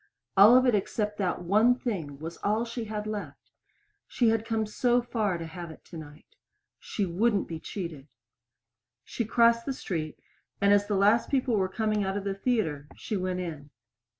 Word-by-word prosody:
All 210 +6 +8
of 255 - +4
it 250 - +4
except 210 +1 -1
that 180 -2 -1
one 215 +7 +4
thing 210 - -3
that 140 0 -12
was 165 +1 -6
all 215 +3 0
she 230 0 -5
had 210 -1 -4
left! 215 -1 -7 0.6
She 235 -3 +2
had 225 0 0
come 225 -1 0
so 240 +3 +2
far 220 -6 -1
to 165 - -6
have 170 +1 -8
it 160 - -13
tonight. 155 -3 -12 0.4
She 205 - -3
wouldn't 200 +4 +1
be 165 -1 -6
cheated. 160 -7 -7 1.0
She 235 - -3
crossed 230 +2 +3
the 275 - 0
street, 160 - -4 0.4
and 200 0 +4
as 205 0 +3
the 205 - 0
last 205 +4 +3
people 260 -4 +1
were 190 -2 +1
coming 215 0 0
out 195 +1 -2
of 200 - -4
the 200 -1 -2
theater 195 - -1
she 215 - -5
went 185 -1 -2
in. 155 -5 -7
205 Hz, 185 wpm, -28 LUFS, 175-225 Hz, 1.0 s, All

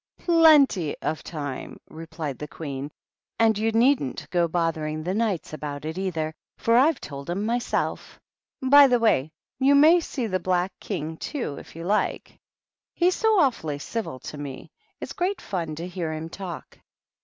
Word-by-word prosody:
" - - -67
Plen 320 -4 +6
tj 170 - -4
of 155 -1 -2
time 145 -5 -6
!" - - -60
replied 160 -3 -6
the 150 - -5
Queen; 140 -2 -6 0.3
" - - -61
and 225 -1 +4
you 220 +2 0
needn't 230 - +2
go 175 -1 +2
bothering 160 -2 -1
the 180 +3 -2
Knights 200 -8 -1
about 150 -1 -5
it, 160 +1 -4
either, 165 -5 -2 0.2
for 230 - +2
I've 275 +3 +4
told 140 +1 -8
'em 195 +4 -1
myself. 240 +2 -2 0.4
By 280 +2 +8
the 250 -2 +3
way, 160 - +2 0.3
you 275 +1 +5
may 315 +5 +7
see 275 -6 -4
the 185 -4 -1
Black 185 +1 0
King, 160 -5 -4
too, 245 - -4
if - - -14
you 165 - -7
like; 205 +4 -1 0.6
he's 360 +1 +3
so 440 -2 +3
awfully 160 - 0
civil 150 - -4
to 150 - -8
me; 140 -2 -8 0.3
it's - - -6
great 365 +2 -1
fun 170 - -4
to 170 +3 -5
hear 175 -3 -4
him 160 +1 -5
talk." 180 -2 -8
180 Hz, 180 wpm, -25 LUFS, 155-245 Hz, 0.6 s, By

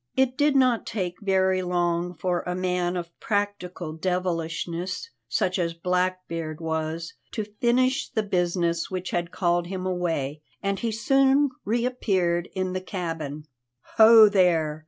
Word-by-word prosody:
It 265 -1 +2
did 290 0 +2
not 255 -4 +3
take 180 -3 -3
very 190 -1 +2
long 175 0 -1
for 175 +2 -1
a 180 - -1
man 180 -1 -1
of 170 -1 -5
practical 200 -5 -2
devilishness, 175 - -2 0.2
such 185 0 0
as 170 -1 -1
Blackbeard 180 -2 -2
was, 160 0 -3 0.2
to 215 - -2 0.2
finish 255 +2 +2
the 220 -4 -1
business 175 -3 0
which 185 -1 -4
had 175 -1 -1
called 175 -1 0
him 185 0 -4
away, 165 -6 -2 0.2
and 195 0 -1
he 230 - -1
soon 270 +4 +3
reappeared 200 -7 0
in 185 -1 -1
the 185 - -2
cabin. 165 -6 -5 0.5
"Ho 220 -1 +9
there! 170 -6 +2
180 Hz, 135 wpm, -25 LUFS, 170-205 Hz, 0.5 s, Ho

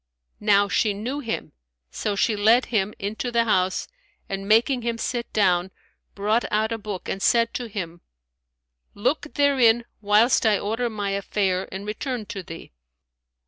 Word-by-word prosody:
Now 205 -1 +4
she 205 +1 +1
knew 245 +8 -4
him; 230 -5 -4 0.4
so 205 - -2
she 210 +2 +1
led 220 +5 +4
him 210 -1 +1
into 215 +4 -4
the 235 -1 +3
house 185 -4 +1 0.4
and, 195 0 -5
making 240 +4 +3
him 235 0 -2
sit 235 0 -3
down, 180 -3 +2 0.5
brought 210 +4 +1
out 215 +2 +1
a 225 - -2
book 205 -3 -6
and 195 - -3
said 230 +2 +3
to 245 - -4
him, 175 -5 -6 0.9
"Look 295 +8 -1
therein 250 -5 +4 0.2
whilst 210 +4 +4
I 215 -3 +4
order 225 +4 -2
my 205 -3 -3
affair 195 -1 -1
and 195 +2 -6
return 230 +2 -4
to 195 - -5
thee." 165 -2 -10
215 Hz, 155 wpm, -24 LUFS, 200-235 Hz, 0.9 s, Now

